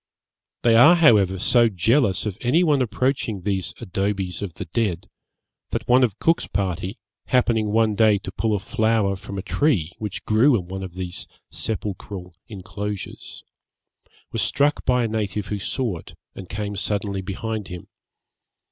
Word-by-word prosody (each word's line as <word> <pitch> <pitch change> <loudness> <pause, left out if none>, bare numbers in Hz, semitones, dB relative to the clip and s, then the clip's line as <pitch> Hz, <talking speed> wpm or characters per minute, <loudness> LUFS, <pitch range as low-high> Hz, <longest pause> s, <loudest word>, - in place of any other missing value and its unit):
They 115 -1 +5
are, 135 +10 +8
however, 105 - +5
so 120 +5 +4
jealous 105 - +2
of 105 -3 -2
any 135 +9 +3
one 150 -5 +3
approaching 120 -3 -1
these 95 -2 -2
abodes 95 -4 -2
of 95 -5 -5
the - - -6
dead, 100 -8 -2 0.6
that - - -3
one 125 +1 +5
of 110 -6 +1
Cook's 165 +1 +1
party, 95 +1 -2 0.3
happening 115 -4 +2
one 110 +1 +2
day 110 -1 +4
to 95 -1 -7
pull 110 +1 0
a - - -1
flower 110 0 +1
from 100 +1 -8
a 95 - -4
tree 100 - +1
which 105 -1 -5
grew 120 +4 +4
in 90 - -5
one 95 +1 -5
of 95 -2 -7
these 90 -1 -5 0.2
sepulchral 100 -3 -5
inclosures, 105 0 -7 0.9
was - - -1
struck 145 +2 +1
by 125 -1 +3
a - - +1
native 105 -2 -3
who 105 - -2
saw 110 -1 -2
it, - - -14 0.2
and 95 -2 -10
came 105 0 -4
suddenly 100 0 -2
behind 105 +2 -4
him. 90 -2 -8
105 Hz, 160 wpm, -23 LUFS, 95-115 Hz, 0.9 s, are